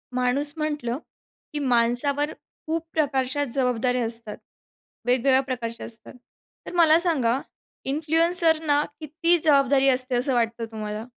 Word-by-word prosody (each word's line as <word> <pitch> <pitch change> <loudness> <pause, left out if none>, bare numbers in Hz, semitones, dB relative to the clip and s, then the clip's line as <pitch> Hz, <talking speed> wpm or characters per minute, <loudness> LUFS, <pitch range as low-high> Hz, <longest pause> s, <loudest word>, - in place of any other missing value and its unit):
माणूस 255 +4 +1
म्हटलं, 295 -6 -3 0.6
की 295 - -3
माणसावर 265 +3 +1 0.4
खूप 325 +1 -2
प्रकारच्या 280 -2 0
जबाबदाऱ्या 250 -2 0
असतात. 225 -2 -4 0.7
वेगवेगळ्या 260 +2 +3
प्रकारच्या 240 -4 -5
असतात. 225 -1 -7 0.5
तर - - -8
मला 330 -2 +5
सांगा, 270 -9 +1 0.5
इन्फ्लुएन्सरना 320 0 +3 0.2
किती 330 +3 0
जबाबदारी 275 -2 +3
असते, 255 0 +3
असं 255 +3 0
वाटतं 230 -1 -1
तुम्हाला? 215 0 -6
270 Hz, 115 wpm, -24 LUFS, 240-305 Hz, 0.7 s, मला